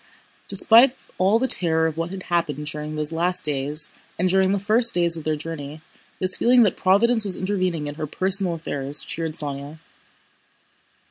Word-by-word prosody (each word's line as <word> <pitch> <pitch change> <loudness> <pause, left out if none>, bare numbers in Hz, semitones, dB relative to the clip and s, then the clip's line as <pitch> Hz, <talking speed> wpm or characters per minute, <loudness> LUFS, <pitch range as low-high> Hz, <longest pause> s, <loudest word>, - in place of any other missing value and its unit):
Despite 230 +6 +5 0.2
all 195 +4 +2
the 260 +3 -1
terror 160 -7 +4
of 160 -2 -3
what 165 +1 -4
had 190 0 -8
happened 165 -4 -3
during 150 +1 -6
those 150 0 +1
last 175 +2 -2
days 150 +1 -2 0.3
and 185 - 0
during 190 +1 +1
the 200 - 0
first 225 +3 +2
days 170 -1 +2
of 160 - -8
their 155 0 -1
journey, 150 -1 -8 0.4
this 185 0 +4
feeling 245 0 +3
that 205 - 0
Providence 225 +5 +2
was 195 -3 -3
intervening 185 -5 -3
in 145 - -6
her 155 +1 -6
personal 185 +2 +1
affairs 145 -3 -5
cheered 165 +1 -5
Sónya. 145 0 -5
170 Hz, 175 wpm, -21 LUFS, 150-195 Hz, 0.4 s, Despite